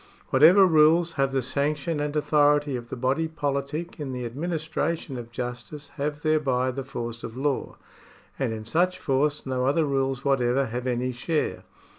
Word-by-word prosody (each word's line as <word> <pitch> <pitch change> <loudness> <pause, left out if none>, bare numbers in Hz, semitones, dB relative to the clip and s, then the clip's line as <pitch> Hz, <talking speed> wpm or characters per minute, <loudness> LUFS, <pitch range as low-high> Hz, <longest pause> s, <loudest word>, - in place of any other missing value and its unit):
Whatever 170 +9 +7
rules 165 0 +4
have 135 -2 +1
the 135 -1 0
sanction 145 +4 -1
and 145 0 -2
authority 145 -1 +3
of 120 -1 -6
the - - -4
body 130 +6 0
politic 150 +2 -3
in 140 -3 -4
the 125 -1 -3
administra 160 +4 -2
tion 140 -4 -9
of 120 -1 -7
justice 125 +5 -6
have 150 0 -4
thereby 135 -5 +1
the 135 +2 -5
force 120 -3 -6
of 115 +2 -7
law; 140 0 -1 0.6
and 130 -4 0
in 110 -1 -6
such 180 +9 +1
force 145 -2 0
no 130 -1 -1
other 150 +3 +2
rules 135 -1 -1
whatever 135 -1 +2
have 120 +2 -4
any 125 +1 -1
share. 150 +6 -2
140 Hz, 170 wpm, -26 LUFS, 125-155 Hz, 0.6 s, Whatever